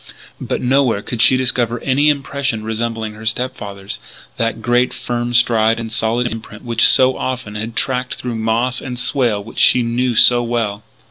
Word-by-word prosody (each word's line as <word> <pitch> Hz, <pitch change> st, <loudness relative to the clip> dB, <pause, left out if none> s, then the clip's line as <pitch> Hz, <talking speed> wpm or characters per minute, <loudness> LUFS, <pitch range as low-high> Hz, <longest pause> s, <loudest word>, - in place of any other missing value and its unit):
But -, -, -3 dB
nowhere 125 Hz, -5 st, +2 dB
could 120 Hz, -2 st, -3 dB
she 130 Hz, -, +6 dB
discover 125 Hz, -2 st, 0 dB
any 140 Hz, +3 st, +2 dB
impression 140 Hz, -5 st, -1 dB
resembling 110 Hz, 0 st, -3 dB
her 110 Hz, +1 st, -12 dB
step 125 Hz, +3 st, -1 dB
father's, 100 Hz, -2 st, -7 dB, 0.4 s
that 115 Hz, 0 st, -1 dB
great, 120 Hz, +2 st, +1 dB
firm 120 Hz, 0 st, -3 dB
stride 115 Hz, -2 st, +3 dB
and 115 Hz, -1 st, -6 dB
solid 115 Hz, +2 st, 0 dB
imprint 110 Hz, -2 st, -7 dB
which 115 Hz, -1 st, +4 dB
so 130 Hz, 0 st, +4 dB
often 125 Hz, -5 st, -4 dB
she 105 Hz, -, -5 dB
had 115 Hz, +2 st, -5 dB
tracked 125 Hz, -1 st, -1 dB
through 125 Hz, -1 st, -5 dB
moss 115 Hz, +3 st, 0 dB
and 125 Hz, -2 st, -6 dB
swale 120 Hz, -4 st, 0 dB
and -, -, -13 dB
which 115 Hz, -, -8 dB
she 125 Hz, -, +5 dB
knew 120 Hz, +1 st, -1 dB
so 120 Hz, +2 st, +5 dB
well. 115 Hz, -4 st, -2 dB
120 Hz, 185 wpm, -17 LUFS, 110-125 Hz, 0.4 s, she